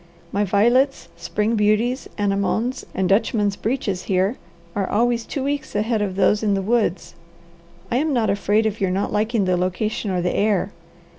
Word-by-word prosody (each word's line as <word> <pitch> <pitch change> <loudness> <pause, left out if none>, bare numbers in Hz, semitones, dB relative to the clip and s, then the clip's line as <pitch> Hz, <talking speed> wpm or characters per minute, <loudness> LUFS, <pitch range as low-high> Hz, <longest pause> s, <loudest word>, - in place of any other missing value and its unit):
My 205 - +1
violets, 240 +8 +2
spring 215 +2 -1
beauties, 220 +5 +1
anemones, 205 +5 0
and 190 -1 +1
dutchman's 205 0 +2
breeches 205 -6 -2
here 190 +4 +1 0.4
are 195 -2 -1
always 235 +1 +1
two 275 - -3
weeks 285 -3 -3
ahead 215 +1 0
of 195 -3 -2
those 205 +1 +3
in 205 -2 +1
the 195 - -1
woods. 215 -4 0 0.8
I 240 - +2
am 305 +3 +1
not 240 -5 +2
afraid 205 +2 +1
of 215 -1 -2
your 190 - +2
not 195 +3 -1
liking 215 0 +1
the 185 -1 +1
location 190 +4 -2
or 180 -2 -1
the 180 - 0
air. 205 -1 +1
210 Hz, 170 wpm, -22 LUFS, 195-230 Hz, 0.8 s, those